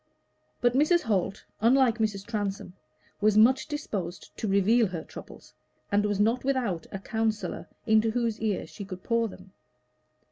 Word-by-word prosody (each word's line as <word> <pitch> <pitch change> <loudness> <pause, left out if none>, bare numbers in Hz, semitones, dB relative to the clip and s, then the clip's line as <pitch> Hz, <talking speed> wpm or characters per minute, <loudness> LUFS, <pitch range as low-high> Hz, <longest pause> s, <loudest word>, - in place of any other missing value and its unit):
But 240 0 +3
Mrs. 310 +6 +4
Holt, 200 -2 -1
unlike 240 0 +4
Mrs. 205 -3 -1
Transome, 205 -5 -3 0.5
was 210 0 +4
much 255 +7 +5
disposed 200 - -5
to 220 - -3
reveal 205 +4 +4
her 170 -4 -5
troubles, - - -12 0.4
and 205 +1 +3
was 205 -1 -1
not 225 +4 +2
without 245 -11 -1
a - - -4
counsellor 220 +2 -2 0.2
into 220 0 +4
whose 230 -1 -1
ear 215 -3 -1
she 205 - -9
could 185 -2 -8
pour 230 -1 +1
them. 190 -1 -13
215 Hz, 150 wpm, -27 LUFS, 200-235 Hz, 0.5 s, much